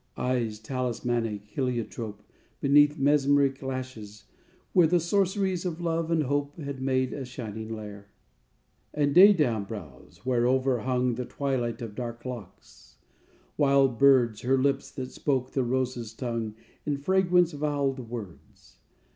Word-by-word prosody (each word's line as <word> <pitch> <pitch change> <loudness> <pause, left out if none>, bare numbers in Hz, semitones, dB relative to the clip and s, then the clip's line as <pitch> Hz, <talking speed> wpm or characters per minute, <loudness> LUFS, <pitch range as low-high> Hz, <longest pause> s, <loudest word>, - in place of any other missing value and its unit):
_ - - -8
Eyes, 120 -4 -1
talismanic 120 -2 -2
heliotrope, 115 -3 -4 0.4
Beneath 145 +2 +4
mesmeric 140 -1 +3
lashes, 130 -6 -6 0.5
where 175 -3 +6
The 175 +2 +3
sorceries 190 +1 0
of 175 -3 -3
love 165 -1 -1
and 165 -2 +2
hope 145 +2 -2
Had 140 -4 -6
made 130 -1 0
a 140 - -4
shining 110 -3 -7
lair. 105 -2 -9 0.9
_And 145 -1 +2
daydawn 155 - +6
brows, 85 - -10
whereover 130 +1 +2
hung 125 -1 +1
The 125 +2 -4
twilight 125 -5 -2
of 110 -3 -6
dark 120 +1 -6
locks; 125 -4 -10 0.6
wild 135 -4 +3
birds, 125 -6 +5
Her 130 +2 +2
lips, 140 +1 0
that 130 -1 -6
spoke 130 -3 -1
the 135 - 0
rose's 125 -2 -2
tongue 115 -3 -3 0.3
In 145 -1 -1
fragrance 180 +2 +3
voweled 140 -4 -1
words. 110 -8 -10
130 Hz, 130 wpm, -27 LUFS, 115-145 Hz, 0.9 s, where